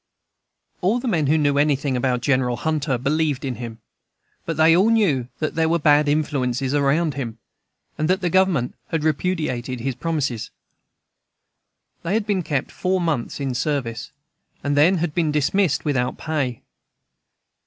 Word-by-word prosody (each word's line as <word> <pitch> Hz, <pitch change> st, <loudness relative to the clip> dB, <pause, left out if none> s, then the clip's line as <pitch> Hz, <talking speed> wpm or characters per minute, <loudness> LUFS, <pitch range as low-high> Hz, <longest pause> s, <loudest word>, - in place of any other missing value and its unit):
All 200 Hz, +7 st, +2 dB
the 255 Hz, -, -4 dB
men 160 Hz, -, +1 dB
who 155 Hz, +3 st, +3 dB
knew 145 Hz, -2 st, +2 dB
anything 145 Hz, -2 st, +1 dB
about 125 Hz, 0 st, 0 dB
General 130 Hz, -3 st, +1 dB
Hunter 150 Hz, -4 st, -1 dB
believed 145 Hz, +2 st, 0 dB
in 125 Hz, -4 st, -3 dB
him; 115 Hz, -1 st, -7 dB, 0.7 s
but 165 Hz, -2 st, -2 dB
they 160 Hz, +1 st, +6 dB
all 195 Hz, +5 st, +4 dB
knew 175 Hz, -, +2 dB
that 155 Hz, -, -2 dB
there 160 Hz, 0 st, +1 dB
were 170 Hz, -, +3 dB
bad 150 Hz, -1 st, +4 dB
influences 135 Hz, -3 st, 0 dB
around 145 Hz, +2 st, +2 dB
him, 120 Hz, -5 st, -5 dB, 0.6 s
and 155 Hz, +2 st, 0 dB
that 185 Hz, +1 st, +3 dB
the 175 Hz, -2 st, 0 dB
Government 185 Hz, -10 st, +2 dB
had 160 Hz, -2 st, -2 dB
repudiated 150 Hz, -6 st, -1 dB
his 135 Hz, +2 st, -1 dB
promises. 130 Hz, -5 st, -2 dB, 1.5 s
They 170 Hz, +5 st, -1 dB
had 220 Hz, -2 st, 0 dB
been 205 Hz, -3 st, 0 dB
kept 145 Hz, -5 st, -2 dB
four 185 Hz, 0 st, 0 dB
months 155 Hz, -9 st, -2 dB
in 135 Hz, -2 st, -2 dB
service, 125 Hz, -3 st, -2 dB, 0.5 s
and 145 Hz, 0 st, 0 dB
then 165 Hz, +6 st, +5 dB
had 165 Hz, -2 st, -2 dB
been 160 Hz, -3 st, +1 dB
dismissed 150 Hz, +2 st, +1 dB
without 130 Hz, -4 st, 0 dB
pay. 140 Hz, -7 st, -3 dB
150 Hz, 155 wpm, -22 LUFS, 130-165 Hz, 1.5 s, they